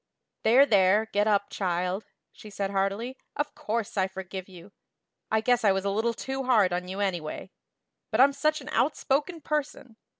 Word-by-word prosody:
"There, 250 Hz, +5 st, +6 dB
there, 205 Hz, -2 st, +4 dB
get 205 Hz, +1 st, +2 dB
up, 205 Hz, -1 st, +1 dB
child," 180 Hz, +1 st, -2 dB, 0.3 s
she 215 Hz, -, -13 dB
said 200 Hz, -1 st, -3 dB
heartily. 200 Hz, +6 st, -2 dB, 0.2 s
"Of 290 Hz, 0 st, -2 dB
course 220 Hz, -1 st, -3 dB
I 190 Hz, -1 st, +2 dB
forgive 190 Hz, 0 st, -7 dB
you. 180 Hz, +1 st, -13 dB, 0.6 s
I 220 Hz, 0 st, +2 dB
guess 245 Hz, +1 st, +2 dB
I 205 Hz, -, +5 dB
was 195 Hz, 0 st, -1 dB
a 200 Hz, -, +1 dB
little 225 Hz, +3 st, 0 dB
too 270 Hz, 0 st, -4 dB
hard 215 Hz, -8 st, +4 dB
on 180 Hz, +1 st, -2 dB
you, 190 Hz, +2 st, -4 dB
anyway. 175 Hz, -6 st, -3 dB, 0.6 s
But 220 Hz, -, -1 dB
I'm 275 Hz, +2 st, +6 dB
such 305 Hz, +2 st, 0 dB
an -, -, -9 dB
outspoken 300 Hz, +4 st, 0 dB
person. 280 Hz, -6 st, -4 dB
210 Hz, 175 wpm, -27 LUFS, 190-255 Hz, 0.6 s, There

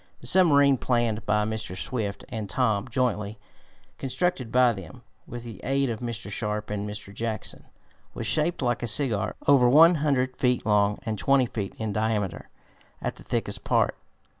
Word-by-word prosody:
The -, -, -14 dB
submarine 140 Hz, -3 st, +5 dB
planned 115 Hz, -3 st, -1 dB
by 105 Hz, 0 st, +2 dB
Mr. 110 Hz, -4 st, -4 dB
Swift 105 Hz, -2 st, -3 dB
and 110 Hz, -3 st, -5 dB
Tom 110 Hz, -3 st, 0 dB
jointly, 110 Hz, -4 st, -1 dB, 0.5 s
and -, -, -38 dB
constructed 130 Hz, -1 st, -1 dB
by 125 Hz, -1 st, +4 dB
them, 95 Hz, -6 st, -10 dB, 0.2 s
with 120 Hz, 0 st, -7 dB
the 115 Hz, -5 st, -9 dB
aid 135 Hz, -1 st, 0 dB
of 110 Hz, -, -4 dB
Mr. 115 Hz, -3 st, -5 dB
Sharp 105 Hz, +1 st, -3 dB
and 105 Hz, 0 st, -3 dB
Mr. 105 Hz, -1 st, -8 dB
Jackson, 110 Hz, 0 st, -4 dB, 0.5 s
was -, -, -4 dB
shaped 155 Hz, -1 st, 0 dB
like 120 Hz, -1 st, 0 dB
a 120 Hz, -, -2 dB
Cigar, 110 Hz, -3 st, +1 dB
over 130 Hz, -4 st, +5 dB
one 160 Hz, +6 st, +7 dB
hundred 130 Hz, -4 st, +1 dB
feet 125 Hz, -3 st, +1 dB
long 105 Hz, -1 st, +2 dB
and 110 Hz, -3 st, -3 dB
twenty 135 Hz, -2 st, +3 dB
feet 105 Hz, -4 st, -5 dB
in 110 Hz, -2 st, -3 dB
diameter 105 Hz, -4 st, -2 dB, 0.5 s
at -, -, -4 dB
the -, -, -13 dB
thickest -, -, -3 dB
part. -, -, +1 dB
115 Hz, 170 wpm, -26 LUFS, 105-130 Hz, 0.5 s, one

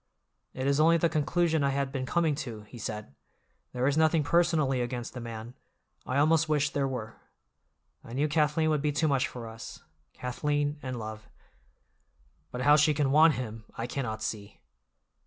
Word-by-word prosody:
"It 130 Hz, -, -3 dB
is 140 Hz, +1 st, +2 dB
only 165 Hz, +2 st, +5 dB
the 170 Hz, 0 st, +2 dB
conclusion 160 Hz, 0 st, +1 dB
I 140 Hz, -, +2 dB
had 135 Hz, 0 st, -1 dB
been 130 Hz, -2 st, -3 dB
coming 165 Hz, -3 st, +2 dB
to," 125 Hz, -7 st, -6 dB
he 115 Hz, +3 st, -12 dB
said. 105 Hz, -9 st, -6 dB, 0.6 s
"There 125 Hz, 0 st, -1 dB
is 145 Hz, +2 st, +2 dB
nothing 160 Hz, 0 st, +3 dB
personally 155 Hz, -5 st, +2 dB
against 120 Hz, 0 st, -4 dB
the 125 Hz, -, -6 dB
man; 115 Hz, 0 st, -7 dB, 0.5 s
I 130 Hz, -, -1 dB
almost 155 Hz, +2 st, +3 dB
wish 150 Hz, -1 st, +2 dB
there 140 Hz, -1 st, 0 dB
were. 115 Hz, -4 st, -6 dB, 0.8 s
I 115 Hz, -, -10 dB
knew 145 Hz, +4 st, +1 dB
Kathleen 155 Hz, +1 st, +2 dB
would 150 Hz, -2 st, +1 dB
be 150 Hz, 0 st, +1 dB
too 150 Hz, +2 st, +1 dB
much 135 Hz, -3 st, +2 dB
for 120 Hz, -2 st, -8 dB
us—Kathleen 145 Hz, +5 st, -4 dB
and 130 Hz, -1 st, -4 dB
love. 110 Hz, -1 st, -7 dB, 1.2 s
But 125 Hz, -, -5 dB
how 145 Hz, +3 st, +6 dB
she 150 Hz, 0 st, +4 dB
can 140 Hz, -2 st, +1 dB
want 155 Hz, +2 st, +6 dB
him, 110 Hz, -3 st, -6 dB
I 115 Hz, -, -2 dB
cannot 120 Hz, -4 st, -4 dB
see." 105 Hz, -2 st, -5 dB
140 Hz, 175 wpm, -29 LUFS, 120-150 Hz, 1.2 s, how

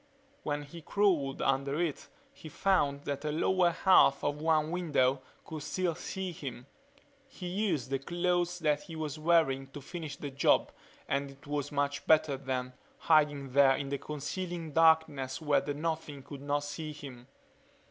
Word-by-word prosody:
When 145 Hz, 0 st, -2 dB
he 165 Hz, +4 st, -11 dB
crawled 165 Hz, -7 st, +1 dB
under 140 Hz, +2 st, +1 dB
it 170 Hz, -4 st, -2 dB, 0.3 s
he 155 Hz, -, -11 dB
found 145 Hz, -5 st, +1 dB
that 140 Hz, -1 st, -3 dB
the 150 Hz, 0 st, -2 dB
lower 175 Hz, +3 st, +3 dB
half 170 Hz, -5 st, +4 dB
of 145 Hz, +1 st, -1 dB
one 155 Hz, -1 st, +2 dB
window 145 Hz, -7 st, +1 dB, 0.2 s
could 160 Hz, -2 st, -6 dB
still 175 Hz, +4 st, -1 dB
see 190 Hz, +3 st, -5 dB
him. 130 Hz, -6 st, -7 dB, 0.6 s
He 190 Hz, -, -10 dB
used 175 Hz, -, -1 dB
the 135 Hz, -, 0 dB
clothes 175 Hz, +2 st, -1 dB, 0.2 s
he 165 Hz, -, -8 dB
was 155 Hz, -1 st, -4 dB
wearing 155 Hz, -5 st, +2 dB
to 140 Hz, +2 st, -9 dB
finish 155 Hz, +1 st, -7 dB
the 145 Hz, -, -6 dB
job 135 Hz, -, +3 dB, 0.4 s
and 140 Hz, 0 st, -1 dB
it 135 Hz, 0 st, -16 dB
was 145 Hz, 0 st, -3 dB
much 145 Hz, 0 st, -1 dB
better 155 Hz, -3 st, +4 dB
then, 130 Hz, -1 st, -3 dB, 0.2 s
hiding 145 Hz, -4 st, +2 dB
there 135 Hz, 0 st, +5 dB
in 140 Hz, 0 st, -4 dB
the 140 Hz, 0 st, -2 dB
concealing 165 Hz, +3 st, -5 dB
darkness 160 Hz, -4 st, +3 dB
where 150 Hz, -3 st, +2 dB
the 145 Hz, -, -4 dB
Nothing 155 Hz, -2 st, -3 dB
could 140 Hz, 0 st, -9 dB
not 145 Hz, +1 st, -1 dB
see 150 Hz, +1 st, -5 dB
him. 130 Hz, -4 st, -10 dB
150 Hz, 160 wpm, -31 LUFS, 140-165 Hz, 0.6 s, there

